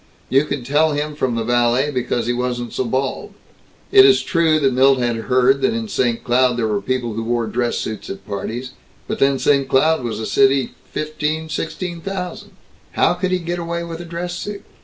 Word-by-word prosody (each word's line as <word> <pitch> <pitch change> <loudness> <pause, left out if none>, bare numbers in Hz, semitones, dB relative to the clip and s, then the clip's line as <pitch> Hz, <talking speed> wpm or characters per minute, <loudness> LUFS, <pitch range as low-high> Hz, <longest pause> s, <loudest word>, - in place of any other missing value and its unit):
You 135 +3 +3
could 140 -5 -4
tell 150 +3 +2
him 150 +1 -2
from 130 -5 -1
the 115 - -1
valet 120 +4 +2
because 120 -3 -1
he 120 - 0
wasn't 120 -1 -3
so 130 - -1
bald. 130 +3 -2 0.6
It 395 -1 +8
is 395 0 +5
true 165 -3 +2
that 135 -3 +2
Milt 135 +1 +5
had 120 -2 0
heard 130 +4 +2
that 225 - +1
in 230 -1 -3
St. 120 - 0
Cloud 125 0 +2
there 115 -2 0
were 105 -2 -1
people 120 +1 -2
who 115 - -3
wore 120 0 0
dress 120 +1 -1
suits 110 -1 -5
at 100 - -7
parties, 115 +5 -5 0.4
but - - -3
then 135 0 +3
St. 140 -1 +2
Cloud 155 +2 +3
was 110 -3 -3
a 110 - -3
city, 135 0 +3 0.2
fifteen 155 +1 -2
or - - -13
sixteen 170 +2 -4
thousand. 180 -1 -6 0.4
"How 170 - +3
could 180 +1 -2
he 185 - +1
get 175 0 -4
away 170 0 -3
with 165 -1 -7
a 175 - -7
dress 170 +1 -5
suit? 200 +3 -6
135 Hz, 210 wpm, -20 LUFS, 120-165 Hz, 0.6 s, It